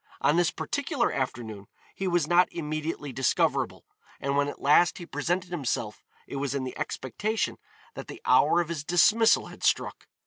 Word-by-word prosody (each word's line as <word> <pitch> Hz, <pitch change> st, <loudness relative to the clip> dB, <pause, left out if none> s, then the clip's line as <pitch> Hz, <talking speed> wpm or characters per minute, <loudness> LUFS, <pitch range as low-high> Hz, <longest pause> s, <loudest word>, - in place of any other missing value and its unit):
On 150 Hz, -, +3 dB
this 175 Hz, -1 st, +3 dB
particular 285 Hz, -3 st, -1 dB
afternoon 110 Hz, -6 st, -4 dB, 0.3 s
he 195 Hz, -, -3 dB
was 175 Hz, -3 st, +2 dB
not 175 Hz, +3 st, +4 dB
immediately 155 Hz, -3 st, -4 dB
discoverable, 130 Hz, 0 st, 0 dB, 0.3 s
and 140 Hz, 0 st, -1 dB
when 145 Hz, 0 st, +2 dB
at 145 Hz, -, -6 dB
last 150 Hz, +5 st, +4 dB
he 175 Hz, -, -8 dB
presented 175 Hz, +1 st, -2 dB
himself 125 Hz, -9 st, -3 dB, 0.2 s
it 140 Hz, -, -6 dB
was 140 Hz, 0 st, -2 dB
in 135 Hz, -, -1 dB
the 130 Hz, -, -5 dB
expectation 210 Hz, -, -2 dB, 0.4 s
that -, -, -8 dB
the -, -, -9 dB
hour 170 Hz, -, +5 dB
of 170 Hz, -, -5 dB
his 160 Hz, -4 st, -4 dB
dismissal 215 Hz, +8 st, +4 dB
had -, -, -13 dB
struck. -, -, 0 dB
155 Hz, 170 wpm, -27 LUFS, 140-175 Hz, 0.4 s, hour